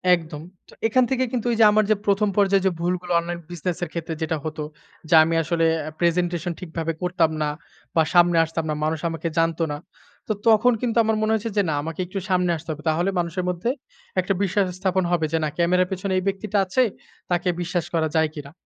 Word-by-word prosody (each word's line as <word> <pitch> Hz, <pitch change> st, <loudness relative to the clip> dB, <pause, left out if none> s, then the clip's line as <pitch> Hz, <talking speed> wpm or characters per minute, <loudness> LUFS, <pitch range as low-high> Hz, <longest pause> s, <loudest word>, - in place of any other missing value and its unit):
একদম। 160 Hz, -3 st, -8 dB, 0.3 s
তো -, -, -15 dB
এখান 255 Hz, +3 st, +3 dB
থেকে 260 Hz, -1 st, +2 dB
কিন্তু 245 Hz, -2 st, -2 dB
এইযে 225 Hz, 0 st, +4 dB
আমার 215 Hz, +1 st, +4 dB
যে -, -, +5 dB
১ম 205 Hz, +1 st, +2 dB
পর্যায়ে 195 Hz, -1 st, +3 dB
যে 190 Hz, -, +4 dB
ভুলগুলো 180 Hz, +1 st, -2 dB
অনলাইন 170 Hz, 0 st, -4 dB
বিজনেস 175 Hz, 0 st, -3 dB
এর 175 Hz, -, -3 dB
ক্ষেত্রে 165 Hz, -1 st, -4 dB
যেটা 160 Hz, 0 st, -1 dB
হতো 155 Hz, -1 st, -4 dB, 0.5 s
যে -, -, +2 dB
আমি 165 Hz, +1 st, 0 dB
আসলে 165 Hz, +1 st, +1 dB, 0.2 s
আ -, -, -3 dB
প্রেজেন্টেশন 175 Hz, 0 st, 0 dB
ঠিকভাবে 165 Hz, -2 st, -3 dB
করতাম 180 Hz, -3 st, +1 dB
না 150 Hz, -, +1 dB, 0.5 s
বা 160 Hz, -, +5 dB
সামনে 175 Hz, -1 st, +5 dB
আসতাম 165 Hz, 0 st, -3 dB
না। -, -, +1 dB
মানুষ 155 Hz, +1 st, 0 dB
আমাকে 165 Hz, 0 st, -4 dB
জানতো 165 Hz, 0 st, +1 dB
না। 145 Hz, -, -3 dB, 0.5 s
তো -, -, -1 dB, 0.2 s
তখন 225 Hz, +2 st, +5 dB
কিন্তু 240 Hz, -2 st, -1 dB
আমার 220 Hz, 0 st, +1 dB
মনে 215 Hz, 0 st, +1 dB
হয়েছে 220 Hz, +1 st, -1 dB
যে 205 Hz, -, +6 dB
না -, -, 0 dB
আমাকে 165 Hz, +2 st, -6 dB
একটু 190 Hz, +2 st, -5 dB
সামনে 180 Hz, -1 st, +2 dB
আসতে 160 Hz, +1 st, -13 dB
হবে। 155 Hz, 0 st, -7 dB
তাহলে 170 Hz, +4 st, +1 dB
মানুষের 175 Hz, +2 st, -2 dB
মধ্যে 180 Hz, +6 st, -2 dB, 0.5 s
একটা 185 Hz, +2 st, +1 dB
বিশ্বাস 200 Hz, +1 st, +1 dB
স্থাপন 190 Hz, -1 st, +1 dB
হবে 170 Hz, -2 st, +2 dB
যে -, -, +3 dB
না 155 Hz, -, 0 dB
ক্যামেরার 180 Hz, +1 st, +3 dB
পেছনে 190 Hz, +1 st, -2 dB
এই 185 Hz, -, 0 dB
ব্যক্তিটা 195 Hz, +1 st, -1 dB
আছে, 220 Hz, +8 st, +2 dB, 0.5 s
তাকে 175 Hz, +1 st, +1 dB
বিশ্বাস 175 Hz, -1 st, -2 dB
করা 160 Hz, -1 st, +2 dB
যায় 160 Hz, -1 st, +3 dB
কিনা। 145 Hz, -2 st, -8 dB
175 Hz, 210 wpm, -23 LUFS, 165-195 Hz, 0.5 s, যে